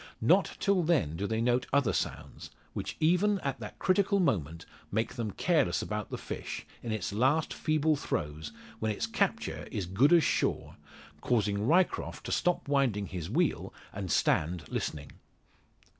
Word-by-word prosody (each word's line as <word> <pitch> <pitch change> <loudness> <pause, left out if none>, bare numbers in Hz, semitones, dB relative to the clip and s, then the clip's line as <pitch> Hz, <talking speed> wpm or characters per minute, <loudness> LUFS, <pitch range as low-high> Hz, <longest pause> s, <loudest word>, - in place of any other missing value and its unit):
Not - - +3
till 200 -2 +2
then 155 - +1
do 100 +4 -2
they 110 +1 -1
note 120 +1 +1
other 140 -4 +2
sounds, - - -4 0.2
which - - -5
even 180 +6 +3
at 140 -3 -3
that 105 -3 -8
critical 200 +1 +2
moment 85 - 0 0.3
make 110 +2 -1
them 115 -3 -3
careless 140 - +1
about 105 -1 -4
the - - -4
fish, - - -6 0.2
in 115 - -4
its 110 -2 -2
last 135 +8 +2
feeble 155 0 +1
throes, 80 - -3 0.3
when 110 -1 0
its 105 - -2
capture - - -1
is 100 - -2
good 105 - +3
as 170 -2 +6
sure, - - 0 0.5
causing 105 -3 +1
Ryecroft 180 +4 +1
to - - -4
stop 180 -4 +1
winding 135 -8 +1
his 85 -3 -5
wheel, - - 0 0.2
and 95 -2 -5
stand 85 +3 +1
listening. 75 -2 -4
115 Hz, 160 wpm, -30 LUFS, 100-155 Hz, 0.5 s, as